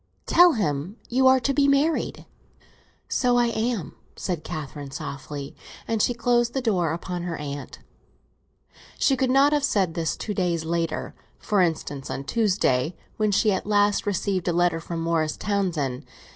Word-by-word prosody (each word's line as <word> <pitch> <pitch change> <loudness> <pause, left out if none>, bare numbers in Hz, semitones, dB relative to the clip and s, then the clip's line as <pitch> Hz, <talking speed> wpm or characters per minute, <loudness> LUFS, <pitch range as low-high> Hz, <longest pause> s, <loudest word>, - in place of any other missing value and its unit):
"Tell 350 -1 +6
him 175 - -2
you 260 +2 +3
are 260 0 +6
to 275 - +1
be 280 0 +3
married." 285 +3 +1 0.8
"So 245 -2 +2
I 240 -1 +3
am," 225 -5 -2 0.2
said 175 -5 -3
Catherine 150 -3 -6
softly; 140 +1 -7 0.3
and 225 -2 0
she 245 - +2
closed 240 +1 +1
the - - +2
door 185 -9 +1
upon 175 +1 -4
her 175 -1 -4
aunt. 145 -1 -6 1.2
She 275 - +3
could 260 -1 0
not 275 +3 +5
have 295 -1 +1
said 195 - +1
this 165 -2 -2
two 210 - -4
days 175 -4 -1
later—for 170 +4 -2
instance, 155 -5 -2
on 135 - -4
Tuesday, 180 - +1 0.2
when 215 -1 +1
she 210 +2 +3
at 190 +1 -2
last 205 0 +2
received 195 -2 -1
a 175 - +2
letter 175 -1 +2
from 165 0 -5
Morris 165 -2 0
Townsend. 175 -11 -1
190 Hz, 160 wpm, -25 LUFS, 160-235 Hz, 1.2 s, Tell